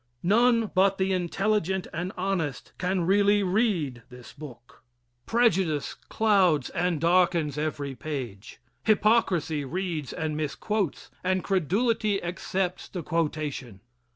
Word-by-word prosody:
None 230 Hz, +3 st, +3 dB
but 195 Hz, +1 st, +3 dB
the 190 Hz, 0 st, +1 dB
intelligent 190 Hz, +1 st, 0 dB
and 180 Hz, +2 st, -3 dB
honest 180 Hz, -8 st, -2 dB
can 185 Hz, 0 st, 0 dB
really 205 Hz, +2 st, +4 dB
read 180 Hz, -, 0 dB
this 125 Hz, -1 st, -12 dB
book. 125 Hz, -5 st, -12 dB, 0.5 s
Prejudice 190 Hz, -, +2 dB
clouds 190 Hz, -, +2 dB
and 175 Hz, -2 st, 0 dB
darkens 170 Hz, -3 st, +2 dB
every 145 Hz, -2 st, -3 dB
page. 125 Hz, -7 st, -6 dB, 0.3 s
Hypocrisy 195 Hz, -8 st, +2 dB
reads 165 Hz, -1 st, -3 dB
and 160 Hz, -2 st, -3 dB
misquotes, 165 Hz, +5 st, -2 dB
and 185 Hz, 0 st, 0 dB
credulity 200 Hz, -, +1 dB
accepts 180 Hz, +1 st, -3 dB
the 180 Hz, -3 st, -5 dB
quotation. 150 Hz, -, -2 dB
180 Hz, 110 wpm, -27 LUFS, 150-195 Hz, 0.5 s, really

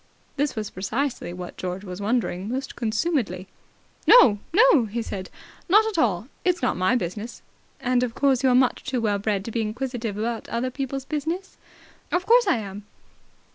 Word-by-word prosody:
This 290 Hz, -1 st, -1 dB
was 215 Hz, -2 st, -4 dB
precisely 220 Hz, +4 st, -2 dB
what 180 Hz, 0 st, -8 dB
George 185 Hz, +1 st, -4 dB
was 185 Hz, 0 st, -7 dB
wondering 205 Hz, -3 st, -1 dB
most 265 Hz, +2 st, -4 dB
consumedly. 230 Hz, -, -1 dB, 0.6 s
"No, 220 Hz, -, +8 dB
no," 370 Hz, -, +5 dB
he 225 Hz, +2 st, -3 dB
said. 190 Hz, -4 st, -6 dB, 0.4 s
"Not 425 Hz, +4 st, +6 dB
at 435 Hz, -6 st, -1 dB
all. 205 Hz, -1 st, 0 dB, 0.2 s
It's 360 Hz, -5 st, +1 dB
not 250 Hz, -, +2 dB
my 185 Hz, +7 st, +2 dB
business." 210 Hz, +2 st, -4 dB, 0.4 s
"And 250 Hz, 0 st, +1 dB
of 245 Hz, -2 st, -2 dB
course 270 Hz, -3 st, +2 dB
you're 260 Hz, -2 st, +4 dB
much 255 Hz, 0 st, +2 dB
too 265 Hz, -2 st, -2 dB
well 210 Hz, -3 st, 0 dB
bred 200 Hz, -1 st, -1 dB
to 230 Hz, -, -5 dB
be 230 Hz, -, -1 dB
inquisitive 230 Hz, -1 st, -3 dB
about 225 Hz, +1 st, -3 dB
other 250 Hz, +2 st, -2 dB
people's 270 Hz, 0 st, -4 dB
business?" 325 Hz, +6 st, -3 dB, 0.6 s
"Of 355 Hz, +1 st, 0 dB
course 475 Hz, 0 st, +5 dB
I 365 Hz, -, +3 dB
am. 205 Hz, -1 st, -7 dB
240 Hz, 175 wpm, -24 LUFS, 205-275 Hz, 0.6 s, No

